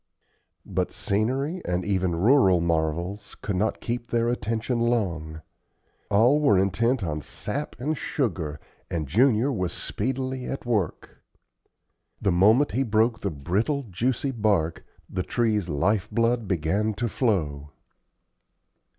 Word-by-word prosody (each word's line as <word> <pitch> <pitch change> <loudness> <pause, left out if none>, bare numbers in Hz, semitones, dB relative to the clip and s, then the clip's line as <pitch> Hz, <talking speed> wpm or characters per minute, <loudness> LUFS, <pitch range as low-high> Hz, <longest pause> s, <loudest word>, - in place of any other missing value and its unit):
But - - -1
scenery, 135 - -1
and 90 0 -1
even 95 -3 0
rural 95 -1 +5
marvels, 85 +4 -1
could 100 - -1
not 105 +4 0
keep 120 0 -3
their 115 0 +1
attention 115 +1 -1
long. 85 -10 -1 0.7
All 120 +8 +4
were 140 -10 +4
intent 115 +6 +1
on 75 -3 -2
sap 145 - -5
and 150 +5 -1
sugar, 85 - -2 0.3
and 80 -4 -2
Junior 120 - +3
was 90 -6 -2
speedily 130 0 -3
at 135 - -5
work. 105 -9 -2 1.0
The 95 - +1
moment 110 +11 +4
he 125 - 0
broke 115 -1 +2
the 100 - -2
brittle, 100 - -1
juicy 125 +8 0
bark, 100 -9 0 0.2
the 95 - -3
tree's 105 -1 0
life 90 +7 +1
blood 115 -1 +1
began 100 +5 0
to 120 +3 -1
flow. 80 - -1
105 Hz, 125 wpm, -26 LUFS, 90-120 Hz, 1.0 s, rural